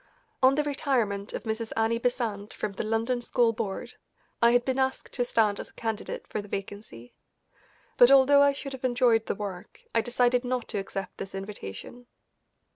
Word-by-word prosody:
On 260 Hz, +1 st, +6 dB
the 300 Hz, -, +2 dB
retirement 245 Hz, -9 st, -1 dB
of -, -, -5 dB
Mrs. 220 Hz, 0 st, -3 dB
Annie 225 Hz, +1 st, +2 dB
Besant 225 Hz, -4 st, -2 dB
from 210 Hz, -, -3 dB
the 195 Hz, -, -4 dB
London 225 Hz, +3 st, 0 dB
School 235 Hz, -1 st, +2 dB
Board 210 Hz, -3 st, -5 dB, 0.4 s
I 235 Hz, -, +7 dB
had 245 Hz, 0 st, +3 dB
been 260 Hz, 0 st, 0 dB
asked 265 Hz, 0 st, -1 dB
to 245 Hz, -, 0 dB
stand 220 Hz, -4 st, +1 dB
as -, -, -8 dB
candidate 225 Hz, -2 st, -4 dB
for 215 Hz, -, -4 dB
the 205 Hz, -, -12 dB
vacancy, 195 Hz, -, -7 dB, 0.8 s
but 245 Hz, -, +8 dB
although 275 Hz, +1 st, +7 dB
I 285 Hz, 0 st, +6 dB
should 275 Hz, 0 st, -6 dB
have 265 Hz, -, -9 dB
enjoyed 240 Hz, -3 st, +3 dB
the -, -, -1 dB
work, 195 Hz, -3 st, -7 dB
I 230 Hz, -, +3 dB
decided 245 Hz, +1 st, +2 dB
not 250 Hz, -1 st, -2 dB
to 210 Hz, -, -2 dB
accept 195 Hz, 0 st, -6 dB
this 195 Hz, -, -6 dB
invitation. 195 Hz, -, -8 dB
230 Hz, 180 wpm, -27 LUFS, 205-250 Hz, 0.8 s, but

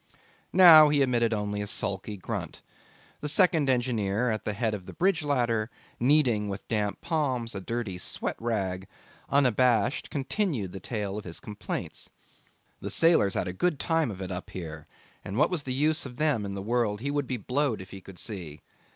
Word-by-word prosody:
Now 160 Hz, -5 st, +9 dB
he 145 Hz, -1 st, +3 dB
emitted 120 Hz, -3 st, +1 dB
only 105 Hz, -1 st, -2 dB
a 105 Hz, -, -4 dB
sulky 100 Hz, +1 st, -1 dB
grunt; 90 Hz, -, -6 dB, 0.6 s
the 150 Hz, -, -3 dB
second 160 Hz, -3 st, +3 dB
engineer 120 Hz, -3 st, +1 dB
at 110 Hz, -, -3 dB
the 105 Hz, -, -1 dB
head 110 Hz, +1 st, -1 dB
of 95 Hz, -4 st, -6 dB
the -, -, -8 dB
bridge 185 Hz, -1 st, +1 dB
ladder, 120 Hz, -6 st, 0 dB, 0.3 s
kneading 120 Hz, -6 st, +3 dB
with 100 Hz, 0 st, -6 dB
damp 105 Hz, -2 st, -1 dB
palms 130 Hz, -8 st, -1 dB
a 95 Hz, -, -5 dB
dirty 110 Hz, -3 st, -4 dB
sweat -, -, -3 dB
rag, 95 Hz, -5 st, -2 dB, 0.4 s
unabashed, 125 Hz, -3 st, +2 dB
continued 135 Hz, -, -2 dB
the 95 Hz, -, -7 dB
tale 105 Hz, 0 st, -4 dB
of -, -, -9 dB
his 85 Hz, -2 st, -6 dB
complaints. 105 Hz, -1 st, -5 dB, 0.7 s
The -, -, -5 dB
sailors 165 Hz, -, +4 dB
had -, -, -1 dB
a 90 Hz, -, -3 dB
good 155 Hz, -, 0 dB
time 160 Hz, -4 st, +1 dB
of 95 Hz, -2 st, -6 dB
it 95 Hz, -, -6 dB
up 90 Hz, 0 st, -5 dB
here, 80 Hz, -4 st, -7 dB, 0.4 s
and 95 Hz, -, -5 dB
what 150 Hz, +6 st, +3 dB
was 175 Hz, -4 st, 0 dB
the 135 Hz, -, -5 dB
use 150 Hz, +5 st, +1 dB
of 125 Hz, -, -11 dB
them 145 Hz, -9 st, +1 dB
in 100 Hz, 0 st, -5 dB
the 95 Hz, -, -5 dB
world 110 Hz, -2 st, 0 dB
he 140 Hz, +2 st, -2 dB
would 145 Hz, -2 st, -1 dB
be 130 Hz, -, -2 dB
blowed 130 Hz, +2 st, -1 dB
if 95 Hz, +1 st, -10 dB
he 95 Hz, -, -9 dB
could 95 Hz, -1 st, -13 dB
see. 85 Hz, -10 st, -6 dB
115 Hz, 190 wpm, -28 LUFS, 100-140 Hz, 0.7 s, Now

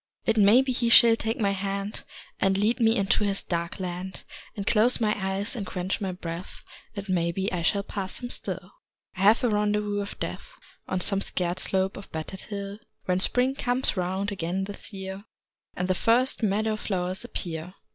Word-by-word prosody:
It 225 Hz, -, +2 dB
may 215 Hz, +4 st, +6 dB
be 265 Hz, -, -1 dB
he 240 Hz, -1 st, 0 dB
shall 235 Hz, -1 st, +8 dB
take 225 Hz, +3 st, -2 dB
my 200 Hz, -3 st, +2 dB
hand 200 Hz, +1 st, -3 dB, 0.3 s
And 195 Hz, 0 st, +2 dB
lead 220 Hz, +5 st, +2 dB
me 225 Hz, 0 st, +4 dB
into 200 Hz, +1 st, +2 dB
his 200 Hz, -1 st, 0 dB
dark 170 Hz, +1 st, -3 dB
land 185 Hz, +1 st, -5 dB, 0.3 s
And 200 Hz, -, -4 dB
close 230 Hz, +5 st, +3 dB
my 215 Hz, -2 st, +2 dB
eyes 195 Hz, +3 st, -2 dB
and 220 Hz, -, -3 dB
quench 185 Hz, +1 st, -3 dB
my 190 Hz, -2 st, -1 dB
breath 175 Hz, 0 st, -7 dB, 0.3 s
It 200 Hz, -1 st, -5 dB
may 170 Hz, -2 st, +1 dB
be 190 Hz, +3 st, -2 dB
I 175 Hz, -, -1 dB
shall 200 Hz, +4 st, +1 dB
pass 195 Hz, -2 st, -4 dB
him 245 Hz, -1 st, -4 dB
still. -, -, -3 dB, 0.4 s
I 185 Hz, -, -5 dB
have 210 Hz, +5 st, +5 dB
a 245 Hz, -, +3 dB
rendezvous 210 Hz, 0 st, +1 dB
with 200 Hz, 0 st, -6 dB
Death -, -, -5 dB, 0.3 s
On 185 Hz, -, -1 dB
some 195 Hz, +2 st, +3 dB
scarred 180 Hz, -2 st, -1 dB
slope 190 Hz, 0 st, 0 dB
of 200 Hz, -, -10 dB
battered 160 Hz, +4 st, -5 dB
hill, 200 Hz, 0 st, -6 dB, 0.3 s
When 180 Hz, 0 st, +1 dB
Spring 250 Hz, +6 st, +3 dB
comes 255 Hz, -2 st, +2 dB
round 190 Hz, +2 st, -1 dB
again 185 Hz, 0 st, -2 dB
this 200 Hz, +2 st, -7 dB
year 190 Hz, 0 st, -7 dB, 0.5 s
And 180 Hz, -, -1 dB
the 185 Hz, -, +2 dB
first 240 Hz, +8 st, +2 dB
meadow 215 Hz, +1 st, +1 dB
flowers 185 Hz, -3 st, -2 dB
appear. 170 Hz, +1 st, -4 dB
200 Hz, 190 wpm, -26 LUFS, 185-215 Hz, 0.5 s, shall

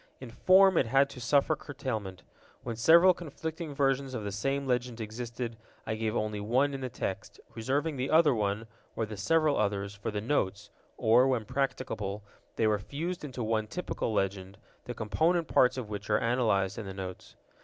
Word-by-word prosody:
In 130 Hz, -3 st, -9 dB
form 190 Hz, +6 st, +5 dB
it 120 Hz, -, +1 dB
had 135 Hz, +3 st, +3 dB
to 125 Hz, -, -10 dB
suffer 140 Hz, +5 st, +3 dB
curtailment. 110 Hz, -11 st, -5 dB, 0.4 s
When 120 Hz, -2 st, -4 dB
several 170 Hz, +10 st, +6 dB
conflicting 160 Hz, -2 st, -6 dB
versions 135 Hz, -1 st, 0 dB
of 110 Hz, -, -4 dB
the 100 Hz, -, -3 dB
same 135 Hz, +8 st, -1 dB
legend 125 Hz, -2 st, -1 dB
existed, 115 Hz, +1 st, -5 dB, 0.3 s
I -, -, -2 dB
gave 110 Hz, 0 st, -2 dB
only 110 Hz, -2 st, -1 dB
one 130 Hz, +7 st, +1 dB
in 135 Hz, -, -5 dB
the 130 Hz, -, -3 dB
text, 95 Hz, -4 st, -5 dB
reserving 140 Hz, +6 st, -1 dB
the 130 Hz, +2 st, -2 dB
other 155 Hz, -3 st, +5 dB
one, 105 Hz, 0 st, -1 dB, 0.3 s
or 110 Hz, -, -1 dB
the 105 Hz, 0 st, -7 dB
several 155 Hz, +6 st, +2 dB
others, 100 Hz, -1 st, -1 dB
for 105 Hz, +1 st, -5 dB
the 105 Hz, -1 st, -2 dB
Notes, 105 Hz, -4 st, -1 dB, 0.3 s
or, 120 Hz, +3 st, +5 dB
when 125 Hz, -5 st, 0 dB
practicable, 110 Hz, -5 st, -3 dB, 0.3 s
they 115 Hz, -, +1 dB
were 105 Hz, -1 st, +2 dB
fused 165 Hz, -, -5 dB
into 130 Hz, -4 st, -5 dB
one 110 Hz, -1 st, 0 dB
typical 175 Hz, -3 st, -3 dB
legend, 95 Hz, -2 st, -2 dB, 0.3 s
the -, -, -6 dB
component 160 Hz, -, +1 dB
parts 125 Hz, 0 st, +3 dB
of 125 Hz, -4 st, -4 dB
which 105 Hz, 0 st, -6 dB
are 105 Hz, -, +4 dB
analyzed 110 Hz, -5 st, +1 dB
in 105 Hz, -, -6 dB
the 95 Hz, -, -7 dB
Notes. 95 Hz, -1 st, -8 dB
120 Hz, 185 wpm, -30 LUFS, 105-140 Hz, 0.4 s, several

